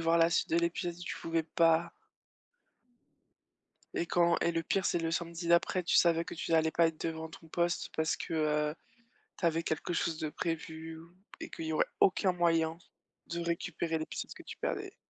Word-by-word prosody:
voir 165 0 +3
la 165 +1 +5
suite - - +1
de 165 - +2
l'épisode, 170 0 -1
tu 175 - -5
pouvais 165 0 0
pas. 165 +1 +2 2.0
Et 170 - 0
quand 170 0 +3
et 170 - +3
le 165 0 0
pire 195 -2 +1
c'est 175 - +2
le 165 0 -1
samedi 170 0 -3
d'après, 170 +1 +3
tu - - +1
savais 170 -1 +4
que - - -7
tu 165 - -5
n'allais 160 0 +4
pas 170 -1 +4
être 160 - -8
devant 160 0 -4
ton 165 0 -13
poste 175 +1 0
parce 160 0 +1
que, 165 - -4
heu, 150 -1 +1 0.6
tu 175 - -1
avais 165 0 +2
quelque 160 +2 -2
chose 165 -1 0
de 155 - -2
prévu 160 -1 -4
ou 165 +2 -14 0.3
et - - -5
qu'il 165 - -6
y 160 - -2
aurait - - +3
aucun 190 0 +4
moyen 165 -2 +2 0.5
de 170 - -3
récupérer 170 -1 -1
l'épisode 155 - -5
que - - -12
tu - - -8
perdais. - - -3
165 Hz, 195 wpm, -32 LUFS, 160-170 Hz, 2.0 s, la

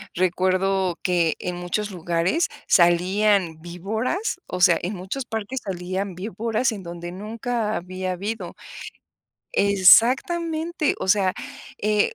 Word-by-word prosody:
Recuerdo 185 0 +1
que 170 -3 +2
en 180 0 -4
muchos 190 +4 -3
lugares 175 - 0 0.2
salían 180 0 +3
víboras, 220 - -3
o 180 - -4
sea, 175 -3 +6
en 190 +4 -3
muchos 190 +9 -5
parques 225 +4 -4
salían 185 0 -4
víboras 220 +5 -1
en 205 -4 -7
donde 175 0 -7
nunca 220 +3 -3
había 185 +1 -4
habido. 205 +5 -5 1.0
Exactamente. 305 - +4
O - - -3
sea, 190 -1 +3 0.5
eh, 210 0 +2
190 Hz, 115 wpm, -23 LUFS, 180-220 Hz, 1.0 s, sea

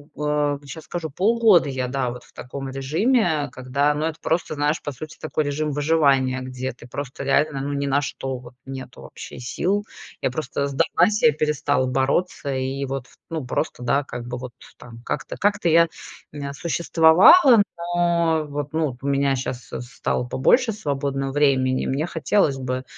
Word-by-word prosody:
в - - -9
а, 145 -1 +1
сейчас 155 +3 -9
скажу, 165 -3 -4
полгода 205 0 +4
я, 130 -2 -2
да, 130 -2 -1
вот 120 0 -8
в - - -22
таком 135 +2 -7
режиме, 155 - +1
когда 140 +3 0
ну, 150 +2 -2
это 160 -1 -3
просто 165 -1 -1
знаешь, 150 +2 0
по 145 - -5
сути, 155 +4 -9
такой 155 0 -1
режим 150 +1 -2
выживания, 140 -4 +2
где 130 0 -4
ты 120 0 -15
просто 140 +1 -6
реально, 140 +1 +2
ну, 145 +1 -3
ни 140 0 -1
на 140 +1 +2
что 135 -2 -4
вот 125 0 -13
нету 130 -1 -8
вообще - - -10
сил. 190 - -1 0.4
Я 130 - 0
просто 140 0 -2
сдалась, 165 +8 +2
я 155 - +5
перестала 150 -3 0
бороться, 135 +7 0
и 135 0 -2
вот, 135 -1 -5
в - - -23
ну, 160 -4 -3
просто 125 0 -2
да, 140 +4 +1
как 120 -2 -7
бы 125 0 -4
вот 125 0 -7 0.3
там, 115 -1 -12
как-то, - - -4
как-то 200 -3 +1
я 170 +1 +5 0.4
н 140 -1 -6
существовала, 170 - +6 0.3
но, 170 -2 +2
вот, 145 0 -4
ну, 155 -6 0
у 140 - -4
меня 140 -1 +2
щас 125 -1 -4
с - - -3
стало 125 0 -3
побольше 225 - +3
свободно 140 -7 -2
времени, 130 -3 +2
мне 140 +5 0
хотелось 160 -4 +1
бы, 130 0 -3
140 Hz, 180 wpm, -23 LUFS, 130-160 Hz, 0.4 s, существовала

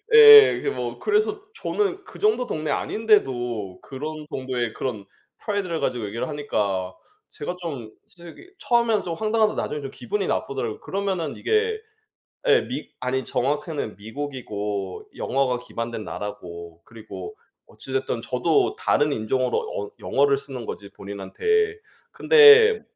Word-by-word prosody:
예. 440 -1 +10
이게 420 - -2
뭐 - - -4
그래서 425 -1 +1 0.2
저는 400 -2 -1
그 - - -13
정도 420 - +2
동네 155 -1 -2
아닌데도 125 - 0
그런 150 +3 -7
정도의 125 -3 -3
그런 110 -7 -4 0.3
프라이드를 195 -6 -2
가지고 120 -4 -1
얘기를 110 +3 -4
하니까. 100 -11 -2 0.4
제가 170 +4 -5
좀 140 -10 -5
솔직히 175 - -14
처음에는 235 -5 +2
좀 170 - -3
황당하다 215 +4 +1
나중에는 150 -1 -3
좀 135 - -6
기분이 195 - -3
나쁘더라고. 120 -5 -2
그러면은 190 -6 -3
이게 440 0 +1 0.7
예, 455 0 +5
미 - - -6
아니 130 +1 -1
정확히는 140 0 -2
미국이고 105 -5 -5
영어가 130 -2 0
기반된 115 -2 -5
나라고 85 -6 -7
그리고 115 - -9 0.3
어찌됐든 400 - -4
저도 410 -1 +1
다른 150 - +1
인종으로 125 +2 0 0.2
언 100 - -5
영어를 140 0 +2
쓰는 135 -4 -7
거지 100 - -7
본인한테. 430 - -1 0.3
근데 445 -1 +7
145 Hz, 320 characters per minute, -24 LUFS, -, 0.7 s, 예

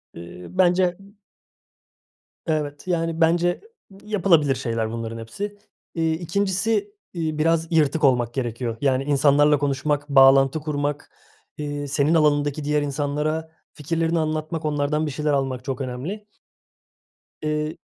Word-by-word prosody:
Eee, 85 +1 -10
bence 180 -1 +2 1.5
Evet, 150 +1 -2
yani, 165 -2 -1
bence 175 +2 +2 0.4
yapılabilir 170 -9 +2
şeyler 115 -3 -2
bunların 115 0 -5
hepsi. 200 - -6 0.4
İii, 160 -1 +1
2'ncisi 200 +4 -1 0.2
iii, 160 -3 -2
biraz 165 +1 +1
yırtık 155 -1 +2
olmak 120 -4 +3
gerekiyor. 120 -2 -3
Yani, 135 -1 +2
insanlarla 145 +1 +4
konuşmak, 145 +1 -1
bağlantı 135 +1 +6
kurmak, 145 -1 -3 0.5
iii, 145 -1 -4
senin 145 +3 +1
alanındaki 145 -2 +2
diğer 150 +1 +1
insanlara 150 +3 -2 0.2
fikirlerini 165 +2 -1
anlatmak, 155 +1 -2
onlardan 150 +1 0
bir 150 - -3
şeyler 150 +1 -1
almak 135 -2 -1
çok 135 -1 -3
önemli. 140 +12 -5 1.1
Eee 150 0 -2
150 Hz, 115 wpm, -23 LUFS, 140-165 Hz, 1.5 s, bağlantı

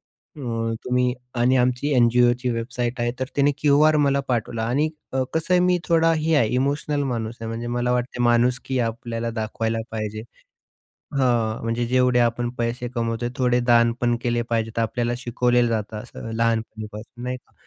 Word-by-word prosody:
अ, 115 -5 -4
तुम्ही 125 0 +1 0.2
आणि 125 +2 +3
आमची 125 +4 +1
एनजीओची 120 +1 +3
वेबसाईट 120 +1 -3
आहे." 120 0 +1
तर 130 - 0
तिने 145 0 +4
क्यूआर 150 +1 +4
मला 140 0 +2
पाठवला 115 -2 -1
आणि 140 +6 +2 0.3
क 130 0 +1
कसं 160 +3 0
आहे 180 - +5
मी 180 0 +3
थोडा 165 -1 +4
हे 160 0 0
आहे, 120 -7 +4
इमोशनल 145 +2 0
माणूस 115 -4 -3
आहे 115 - -4
म्हणजे 115 +1 -4
मला 120 +1 0
वाटते 125 0 -1
माणुसकी 125 +2 +2
आपल्याला 115 0 -2
दाखवायला 110 0 -2
पाहिजे 110 -1 -4 1.0
हां, 120 -4 +1
म्हणजे 115 +1 -1
जेवढे 125 0 +3
आपण 120 0 +1
पैसे 120 +1 -2
कमवतोय 115 0 -1
थोडे 125 -1 +2
दान 120 -1 +4
पण 120 -1 +2
केले 120 -1 0
पाहिजेत 115 -1 -1
आपल्याला 120 +1 0
शिकवले 120 0 +1
जातं 110 -1 -2
असं 105 +1 -8
लहानपणीपासून, 110 0 -3
नाही 125 +1 -3
का? 125 - -21
120 Hz, 165 wpm, -23 LUFS, 115-125 Hz, 1.0 s, आहे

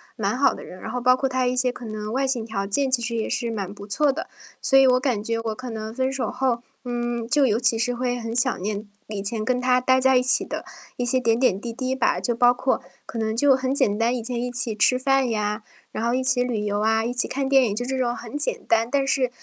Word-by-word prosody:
蛮 215 +1 -1
好 280 - +3
的 - - -9
人， 185 - -11
然 220 - -6
后 250 - -2
包 255 +1 +5
括 270 - 0
他 255 -1 0
一 250 +1 0
些 250 0 +2
可 245 - -10
能 215 0 -5
外 270 +2 0
形 250 -4 0
条 200 -3 -3
件 265 +7 0
其 255 -2 +2
实 235 0 -2
也 220 - -2
是 235 -2 -2
蛮 200 -3 -4
不 200 0 -10
错 275 +8 +2
的。 315 - -5 0.3
所 270 - +3
以 265 - +6
我 255 0 +4
感 250 -6 -1
觉 230 +1 -2
我 225 -1 -3
可 255 -1 -7
能 220 0 -6
分 260 +1 -1
手 270 -1 -2
后， 250 -2 -1 0.2
嗯， 240 -1 -3
就 290 0 +3
尤 225 -1 +1
其 230 -2 +3
是 245 +2 0
会 245 0 -2
很 225 0 -5
想 250 -3 +2
念 210 +1 -4 0.2
以 210 -2 -5
前 215 +2 -2
跟 250 0 +1
他 250 0 +3
待 260 +1 +3
在 265 0 +4
一 250 - +2
起 255 - +5
的 - - -5 0.3
一 245 - -1
些 255 +1 +2
点 230 -2 +2
点 200 -7 +2
滴 235 +1 -5
滴 255 +1 -2
吧。 265 - +1
就 240 - 0
包 245 +1 +5
括 260 +1 -1 0.2
可 230 - -6
能 220 0 -1
就 275 +2 +4
很 260 +1 -1
简 205 -6 +2
单， 235 +2 +1
以 235 - -4
前 240 0 -2
一 250 - -2
起 245 -2 0
吃 220 +4 +4
饭 270 -1 +1
呀， 210 -1 -2 0.3
然 220 - -4
后 235 +1 +1
一 260 - 0
起 250 -1 +3
旅 235 -4 -2
游 205 0 -1
啊， 220 +1 +2
一 245 - -2
起 250 - +3
看 270 0 -2
电 270 -2 +4
影， 205 -2 -2
就 245 +2 -2
这 265 +1 -2
种 245 -2 0
很 235 +4 -9
简 295 - -1
单， 230 0 +2
但 275 0 +1
是 265 -2 +1
245 Hz, 300 characters per minute, -23 LUFS, 225-260 Hz, 0.3 s, 以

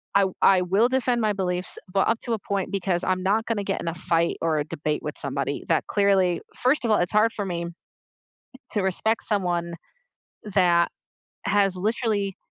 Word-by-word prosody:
I 200 0 +5 0.2
I 190 -2 +5
will 195 +7 +2
defend 255 -2 +1
my 215 -1 +2
beliefs, 180 -2 -3 0.2
but 195 - +2
up 225 0 +1
to 235 - -2
a 225 - -1
point, 200 -2 -3
because 185 -2 -1
I'm 185 0 0
not 205 +4 +1
gonna 220 -3 -1
get 195 -1 -2
in - - -6
a 165 - -1
fight 170 0 0
or 160 -1 +1
a 150 - +1
debate 150 0 -3
with - - -4
somebody - - -3
that - - +1
clearly 195 -4 +2
first 260 +3 +2
of - - 0
all, 210 - +5
it's 175 0 0
hard 215 +2 +4
for 205 - -3
me 170 -2 -3 1.0
to 205 - 0
respect 205 +4 0
someone 175 -4 -1 0.7
that 180 -4 +3 0.5
has 200 -2 +2
literally, 205 -1 -1
195 Hz, 185 wpm, -25 LUFS, 175-215 Hz, 1.0 s, I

